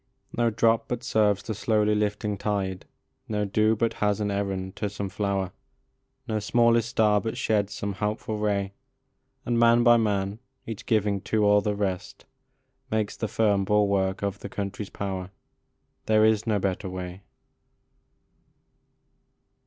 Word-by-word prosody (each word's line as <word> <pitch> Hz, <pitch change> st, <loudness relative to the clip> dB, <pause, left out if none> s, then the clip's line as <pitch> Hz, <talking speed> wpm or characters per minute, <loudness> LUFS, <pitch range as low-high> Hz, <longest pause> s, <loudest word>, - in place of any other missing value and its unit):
No 120 Hz, 0 st, +2 dB
drop 115 Hz, +1 st, +2 dB
but 120 Hz, 0 st, -3 dB
serves 105 Hz, -4 st, +2 dB
the 110 Hz, -, -3 dB
slowly 105 Hz, 0 st, +1 dB
lifting 105 Hz, 0 st, -1 dB
tide, 95 Hz, -2 st, -2 dB, 0.4 s
No 105 Hz, -1 st, 0 dB
dew 110 Hz, +2 st, +2 dB
but 115 Hz, +1 st, 0 dB
has 105 Hz, 0 st, +2 dB
an 105 Hz, -1 st, -1 dB
errand 95 Hz, -2 st, -3 dB
to 105 Hz, -, -2 dB
some 100 Hz, -1 st, -4 dB
flower, 100 Hz, -1 st, -1 dB, 0.8 s
No 110 Hz, -2 st, -1 dB
smallest 115 Hz, +2 st, +3 dB
star 105 Hz, -3 st, +3 dB
but 115 Hz, -, -4 dB
sheds 105 Hz, -2 st, 0 dB
some 100 Hz, 0 st, -3 dB
helpful 105 Hz, +1 st, -3 dB
ray, 100 Hz, -2 st, 0 dB, 0.7 s
And 120 Hz, -1 st, +1 dB
man 115 Hz, 0 st, +5 dB
by 120 Hz, 0 st, +7 dB
man, 100 Hz, -2 st, 0 dB, 0.3 s
each 115 Hz, -3 st, -7 dB
giving 105 Hz, -3 st, +1 dB
to 110 Hz, -1 st, +2 dB
all 105 Hz, 0 st, +5 dB
the 105 Hz, 0 st, -1 dB
rest, 95 Hz, -3 st, -3 dB, 0.6 s
Makes 110 Hz, -1 st, -1 dB
the 110 Hz, -, -3 dB
firm 105 Hz, -3 st, +2 dB
bulwark 100 Hz, -1 st, +1 dB
of 100 Hz, 0 st, -2 dB
the 100 Hz, -, -7 dB
country 100 Hz, +1 st, -4 dB
s -, -, -14 dB
power 95 Hz, -2 st, -4 dB, 0.8 s
There 110 Hz, 0 st, +5 dB
is 110 Hz, 0 st, +2 dB
no 110 Hz, -2 st, +2 dB
better 95 Hz, 0 st, -2 dB
way. 90 Hz, 0 st, -6 dB
105 Hz, 150 wpm, -26 LUFS, 100-110 Hz, 0.8 s, by